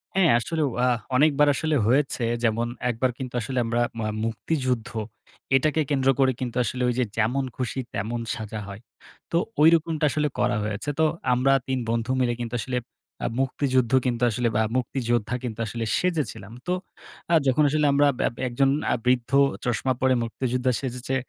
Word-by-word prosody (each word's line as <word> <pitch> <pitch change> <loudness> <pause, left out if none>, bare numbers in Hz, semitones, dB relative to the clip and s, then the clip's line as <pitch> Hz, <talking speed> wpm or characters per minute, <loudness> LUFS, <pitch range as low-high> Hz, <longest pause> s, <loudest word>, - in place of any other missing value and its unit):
হ্যাঁ। 190 -4 +4
আসলেও 155 +3 -1 0.2
আ - - +3 0.3
অনেকবার 145 +1 +4
আসলে 155 0 0
হয়েছে। 135 0 +2 0.2
যেমন, 115 0 +1 0.2
একবার 125 +2 0
কিন্তু 130 -3 -6
আসলে 130 +2 -2
আমরা 120 +1 0 0.2
মা 110 - -1 0.2
মুক্তিযুদ্ধ 125 +1 -1 0.7
এটাকে 155 +3 +2
কেন্দ্র 135 -2 +2
করে 135 -1 +4
কিন্তু 125 -3 -4
আসলে, 125 +2 -3
ঐ - - +3
যে 125 - +3
যেমন 120 +5 +1
খুশি 130 +1 -3
তেমন 110 +4 -2 0.2
সাজা 110 -1 -6
হয়। 100 +1 -9 0.5
তো 170 - +2 0.2
ঐরকমটা 160 -1 +4
আসলে 150 +1 +1
করা 120 -1 +2
হয়েছে। 105 +6 -3
তো 160 - +5 0.3
আমরা 130 +2 +3 0.2
৩ 130 -1 0
বন্ধু 115 +2 -1
মিলে 120 -1 +2
কিন্তু 120 -1 -5
আসলে 125 +3 -2 0.5
আ - - +2
মুক্তিযুদ্ধ 130 -2 +1
কিন্তু 120 -1 0
আসলে 120 +2 0 0.2
আ - - +1
মুক্তিযোদ্ধা 120 -2 -1
কিন্তু 115 -3 -5
আসলে 115 +2 -3
সেজেছিলাম। 150 - -2 0.2
তো - - 0 0.6
আ - - +4
যখন 130 +3 +3
আসলে 150 +1 +1
আমরা 145 +1 +4
ব্য - - +1 0.2
একজন 135 +2 +2 0.2
আ - - +3
বৃদ্ধ 125 -1 +1 0.3
চশমা 120 +2 0
পরে 130 0 +4
মুক্তিযোদ্ধা 125 +2 -1
সেজেছে, 130 0 -3
125 Hz, 165 wpm, -25 LUFS, 115-140 Hz, 0.7 s, তো